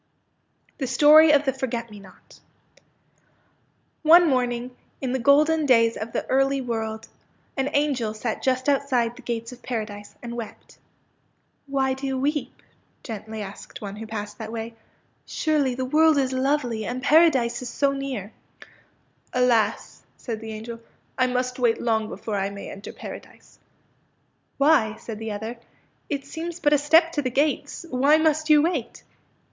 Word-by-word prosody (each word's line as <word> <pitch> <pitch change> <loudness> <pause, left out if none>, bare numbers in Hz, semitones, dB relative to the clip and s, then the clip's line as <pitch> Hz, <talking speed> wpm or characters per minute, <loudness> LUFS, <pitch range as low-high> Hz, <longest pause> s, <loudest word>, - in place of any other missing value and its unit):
THE 265 - -2
STORY 300 +4 +7
OP 290 -1 +4
THE 265 - +1
FORGET 235 -3 -4
ME 210 - -10
NOT 190 -2 -17 1.6
One 335 +2 +7
morning, 250 -2 -1 0.2
in 260 -2 -3
the 260 - -1
golden 300 +4 +4
days 230 -3 +4
of 220 +1 -6
the - - -2
early 270 +1 +2
world, 225 -3 -4 0.5
an 270 0 -1
angel 260 -7 0
sat 220 +1 -3
just 255 0 0
outside 260 -4 +1
the - - -12
gates 230 0 -4
of 250 - -12
Paradise, 215 -4 -5
and 235 0 -6
wept. 230 -3 -8
'^ - - -19 0.9
Why 270 -1 0
do 265 +1 -5
you 265 -1 -2
weep? 290 +3 -2 0.2
" - - -41
gently 220 -2 -6
asked 195 0 -10
one 200 -1 -7
who 220 +1 -7
passed 215 +1 -6
that 220 -1 -6
way. 230 0 -5 0.3
" - - -42
Surely 295 -5 0
the 260 0 -2
world 310 +3 +4
is 265 -2 +1
lovely, 260 -4 0
and 250 +3 -4
Paradise 270 -6 +4
is 250 - -5
so 280 +2 +1
near! 265 -7 -5 0.4
" - - -30
'' - - -40
Alas! 245 -3 +1
" - - -40
said 230 -3 -5
the 220 0 -7
angel, 230 +2 -7 0.2
'' - - -40
I 255 - +4
must 250 0 -2
wait 240 -2 +2
long 220 -2 0
before 215 -2 -4
I 195 0 -1
may 200 0 -8
enter 195 +1 -9
Paradise." - - -11
^^ - - -41 0.9
Why," 275 -7 +3
said 220 -1 -8
the 225 -1 -4
other, 220 +3 -5
'^ - - -20 0.5
it 280 -2 -3
seems 330 +4 -6
but 295 -3 +3
a 295 - +4
step 325 +3 +4
to 295 - -1
the 255 - -1
gates. 290 +6 -1
Why 275 +4 +4
must 315 0 +1
you 300 -1 +6
wait? 320 -8 -2
255 Hz, 175 wpm, -24 LUFS, 225-285 Hz, 1.6 s, STORY